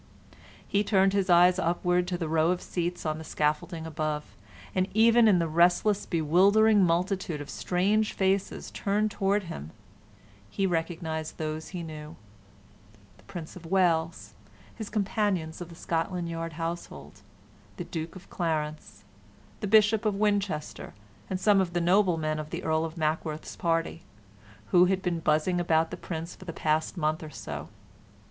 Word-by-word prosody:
He 205 +1 +1
turned 195 -2 +3
his 195 -2 +1
eyes 175 +1 +6
upward 180 +1 +1
to 180 -1 -2
the 165 -2 -3
row 160 +1 +2
of 180 0 +1
seats 175 0 -3
on 155 0 -1
the - - -7
scaffolding 160 +2 -1
above, 155 -1 -3 0.4
and 185 0 +1
even 230 +1 +6
in 200 -4 +5
the 170 -1 +1
restless, 175 +5 +3
bewildering 195 +6 +4
multitude 180 -1 0
of 145 - -7
strange 205 +4 +1
faces 195 0 -1
turned 210 +2 0
towards 200 0 0
him 80 - -7 0.9
recognized 165 -3 -2
those 155 0 -4
that - - -12
he 175 -2 -4
knew: 155 -1 -8 1.0
the - - -21
Prince 165 -3 -8
of 170 -2 -10
Wales, 165 - +1 0.4
his 220 - -7
companions 200 -6 -1
of 175 - -7
the 170 - -11
Scotland 170 +1 -2
Yard 165 0 -4
household, 165 +2 -6 0.6
the - - -4
Duke 160 +1 -6
of 185 - -12
Clarence, 155 -3 -3 0.6
the 210 - -3
Bishop 215 +1 +4
of 215 -2 +1
Winchester, 200 - -1 0.3
and 185 - -2
some 200 0 +4
of 175 -2 -2
the 175 - +1
noblemen 170 -4 +2
of 155 0 -6
the 170 +3 -5
Earl 160 0 +1
of 165 +1 -7
Mackworth's 155 0 -2
party, 165 -1 -1 0.7
who 180 0 +7
had 190 0 0
been 175 -2 -1
buzzing 160 +3 +1
about 160 -1 +2
the - - -3
Prince 170 -1 -6
for 185 - -13
the 165 - -6
past 155 +3 0
month 155 -1 0
or 155 - -7
so. 150 - -7
175 Hz, 160 wpm, -28 LUFS, 160-190 Hz, 1.0 s, who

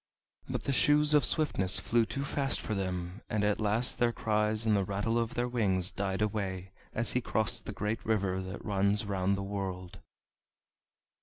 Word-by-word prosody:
But - - -3
the 140 - -1
Shoes 150 +2 +4
of 150 - +5
Swiftness 95 - +3
flew 115 +2 +1
too 140 +1 -3
fast 135 -2 +1
for 110 - -3
them, 90 0 -3
and 105 -1 0
at 105 0 +1
last 110 +4 0
their 120 -1 +3
cries 110 0 0
and 110 -1 +3
the 100 - +2
rattle 100 +5 -1
of 115 0 -2
their 120 0 0
wings 95 -7 +1
died 95 +1 -1
away 95 -3 -3 0.2
as 115 0 -1
he 125 - 0
crossed 110 -1 -1
the - - -3
great 105 +2 -3
river 100 -4 0
that 95 +1 -7
runs 100 0 +1
round 100 -1 0
the 100 - -3
world. 95 -2 -5
105 Hz, 180 wpm, -31 LUFS, 95-115 Hz, 0.2 s, of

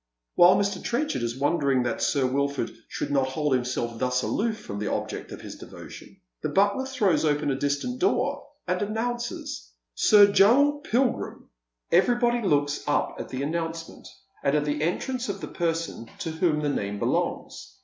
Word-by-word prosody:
While 175 +2 +7
Mr. 200 -1 -1
Trenchard 270 - -1
is 120 +1 -2
wondering 140 -3 +2
that 120 -1 -2
Sir 140 -2 +2
Wilford 140 -1 -1
should - - -4
hold 140 +1 +1
himself 120 -2 -1
thus 125 0 0
aloof 220 0 -1
fi'om 100 - -5
the 105 - -2
object - - -4
of - - -8
his - - -8
devotion, - - -12 0.2
the - - -2
butler 200 +7 +2
throws 210 - +1
open 150 -1 +1
a - - 0
distant 145 - -2
door, 375 - 0 0.2
and 180 +2 0
announces 225 - -3
— - - -57
" - - -58
Mr. 205 - +6
Joel 285 +9 +5
Pilgi 260 -4 +1
im." - - -21 0.4
Everybody 240 +6 +3
looks 145 -7 +1
up 145 - 0
at - - -6
the 130 +1 -3
announcement, 165 +2 -4 0.3
and 140 - +1
at 150 0 +1
the 150 0 -1
entrance 245 - -2
of 200 0 -3
the - - -6
person 165 -8 -3
to 165 - -4
whom 160 -2 +1
the 145 - +1
name 100 -7 -2
belongs. - - -2
160 Hz, 175 wpm, -26 LUFS, 140-210 Hz, 0.4 s, While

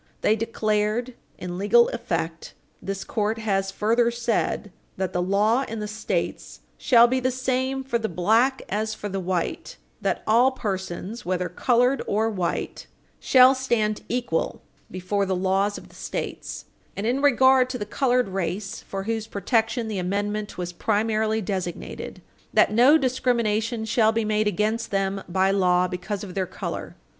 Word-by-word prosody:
They 215 - +3
declared, 220 +2 -1 0.2
in 180 0 -6
legal 235 +4 +5
effect, 165 -7 -4 0.3
this 195 0 -4
court 215 +1 -1
has 195 -3 0
further 230 +4 +2
said, 235 -3 -1 0.3
"that 190 -2 -2
the 180 - 0
law 210 +7 +2
in 225 0 -5
the 210 - -3
States 215 +1 -3 0.2
shall 235 -2 +6
be 255 +2 +1
the 255 0 +1
same 260 +1 -1
for 260 -3 -1
the 220 - -2
black 225 +10 +2
as 215 +2 -2
for 210 - -5
the 195 0 -3
white; 180 -2 -3 0.2
that - - -1
all 235 +4 +5
persons, 195 +1 -4
whether 180 -1 -1
colored 245 +7 +2
or 220 +2 +1
white, 185 -5 -3 0.3
shall 255 0 +6
stand 235 -5 0
equal 240 -9 -2 0.3
before 190 +2 -1
the 190 - 0
laws 195 +2 +1
of - - -12
the - - -20
States, - - -5 0.3
and, 200 - -3
in 250 +4 +1
regard 260 -2 +5
to 255 - -3
the 205 - -4
colored 250 0 +1
race, 195 +1 -3
for 195 0 -5
whose 225 +1 -3
protection 225 +2 0
the 210 -3 -3
amendment 205 +3 -2
was 175 -1 -4
primarily 220 +2 0
designed, 185 -3 -5 0.3
that - - +4
no 255 +7 +6
discrimination 235 -4 0
shall 220 0 +3
be 225 0 -1
made 215 0 +1
against 215 +3 0
them 195 0 -1
by 190 +2 +2
law 180 -2 +3
because 185 +3 -4
of 190 -3 -7
their 190 -1 -1
color." - - -6
215 Hz, 160 wpm, -24 LUFS, 195-235 Hz, 0.3 s, shall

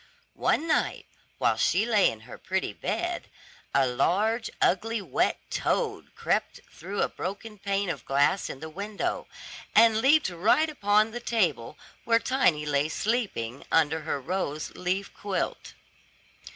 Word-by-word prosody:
One 325 - +2
night, - - 0 0.3
while - - +2
she 195 +5 +2
lay 215 -4 +4
in 110 - -8
her 110 - -11
pretty - - -2
bed, - - -3 0.4
a 135 0 +3
large, 210 - +1
ugly, 225 +5 +1
wet 195 - 0
toad - - -1
crept - - -1
through 190 +5 -3
a - - +2
broken 205 +2 -6
pane 200 0 -1
of 175 - -4
glass 145 +8 +2
in 135 - -8
the 160 - -5
window, 200 +5 -3 0.5
and 220 0 +6
leaped 290 -1 +4
right 220 - +2
upon 215 -4 +2
the 240 - -5
table 180 - -1 0.3
where 230 0 +4
Tiny 230 - +2
lay 145 +1 +1
sleeping 190 - -2
under 160 0 +3
her 155 -2 -2
rose 155 -1 -3
leaf 185 +2 -3
quilt. 200 -2 -3
195 Hz, 140 wpm, -27 LUFS, 155-225 Hz, 0.5 s, and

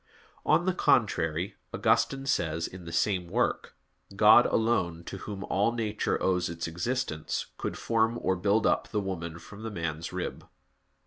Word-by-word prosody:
On 175 - +4
the 185 - +2
contrary, 90 - +1
Augustine 135 0 +1
says, 85 -9 0
in 90 -1 -9
the 85 - -7
same 90 +1 +1
work: - - -1 0.4
"God - - +7
alone, 95 -8 0
to 95 - -7
Whom 100 +1 -6
all 105 +4 +1
nature 110 -3 -1
owes 90 -2 +1
its 85 0 -4
existence, 85 0 -2
could - - -3
form 115 0 +1
or 95 - +1
build 100 +4 +2
up - - +2
the 105 - -1
woman 85 -4 -4
from 100 +5 -12
the 115 - -4
man's 85 -4 -4
rib." 90 0 -4
95 Hz, 155 wpm, -29 LUFS, 85-110 Hz, 0.4 s, God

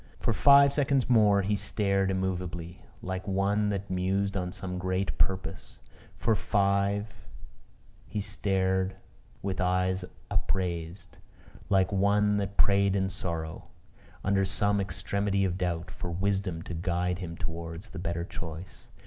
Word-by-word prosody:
For - - +1
five 140 0 +7
seconds 140 -3 +2
more 105 -4 +5
he 105 +2 +1
sate 100 -2 0
immovably, 90 -3 -3 0.2
like 95 +1 -4
one 100 +2 +1
that 100 -1 -2
mused 95 +2 0
on 90 -2 -2
some 90 0 -5
great 95 -1 -1
purpose. 95 -1 -1 0.4
For 115 - +1
five 100 -1 +1 0.9
he 105 - -3
sate 95 -1 0 0.5
with 95 -1 -2
eyes 90 +1 +1 0.3
upraised, 85 -3 -2 0.5
like 95 -1 +3
one 105 +1 +3
that 100 0 -3
prayed 100 -1 +4
in 95 -1 +1
sorrow, 85 -4 -4 0.6
under 100 0 +2
some 100 +1 +2
extremity 100 +2 0
of 90 -2 -1
doubt, 85 -2 -2
for 90 - -6
wisdom 95 -1 -1
to 90 - -6
guide 90 +1 -1
him 85 -2 -6
towards 85 +4 -6
the - - -7
better 85 0 -2
choice. 85 +1 -8
95 Hz, 130 wpm, -29 LUFS, 90-100 Hz, 0.9 s, five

